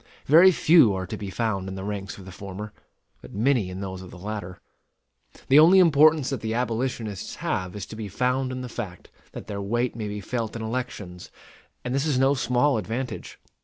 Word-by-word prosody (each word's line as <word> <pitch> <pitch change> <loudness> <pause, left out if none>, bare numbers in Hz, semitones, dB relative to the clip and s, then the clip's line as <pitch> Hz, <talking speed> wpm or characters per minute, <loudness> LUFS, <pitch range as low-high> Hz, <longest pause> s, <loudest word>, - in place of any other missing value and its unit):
Very 170 +6 +7
few 155 - +5
are 95 0 -3
to - - -6
be 100 - -6
found 95 -1 -2
in 95 - -6
the 95 - -6
ranks 100 -1 -5
of 95 - -12
the 95 - -9
former; 100 +2 -8 0.5
but - - -12
many 115 -3 +2
in 90 +1 -6
those 95 -1 -5
of 95 - -10
the 90 - -11
latter. 95 -2 -6 0.9
The 135 +3 +7
only 170 +5 +7
importance 155 -4 +5
that 135 -5 -3
the 110 0 -2
abolitionists 115 -4 -3
have 90 0 -3
is 100 -2 -5
to 110 - -10
be 110 -1 -5
found 125 +5 0
in 130 0 -5
the 125 - -5
fact 105 -7 -7 0.2
that - - -8
their 100 -2 -5
weight 120 +5 -1
may 110 -2 -4
be 105 0 -5
felt 115 +2 -4
in 115 - -5
elections; 110 -7 -5 0.6
and 125 - -2
this 140 +3 0
is 145 -4 +1
no 135 +2 +4
small 125 0 +1
advantage. 120 +5 -5
110 Hz, 205 wpm, -25 LUFS, 100-130 Hz, 0.9 s, Very